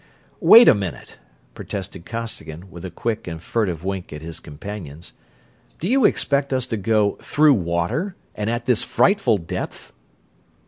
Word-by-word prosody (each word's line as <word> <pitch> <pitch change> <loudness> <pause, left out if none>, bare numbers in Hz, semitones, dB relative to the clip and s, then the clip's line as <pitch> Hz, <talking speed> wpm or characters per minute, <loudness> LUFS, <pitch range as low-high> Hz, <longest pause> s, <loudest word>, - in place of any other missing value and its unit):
"Wait 235 +2 +9
a - - +9
minute!" 95 - -6 0.3
protested 95 -3 -7
Costigan, 95 -7 -6
with 85 -1 -10
a 95 - -5
quick 110 +5 -3
and 80 -1 -5
furtive 90 -3 -2
wink 95 -1 -4
at 75 +1 -8
his 85 0 -6
companions. 80 0 -9 0.7
"Do 170 - -3
you 260 +1 +3
expect 140 -6 +2
us 130 -2 0
to 115 -3 -3
go 105 0 +1
through 150 -1 +4
water, 105 - -1 0.2
and 105 +1 -3
at 120 0 -2
this 125 -3 +2
frightful 180 - +2
depth?" 85 -3 -6
105 Hz, 150 wpm, -22 LUFS, 85-125 Hz, 0.7 s, Wait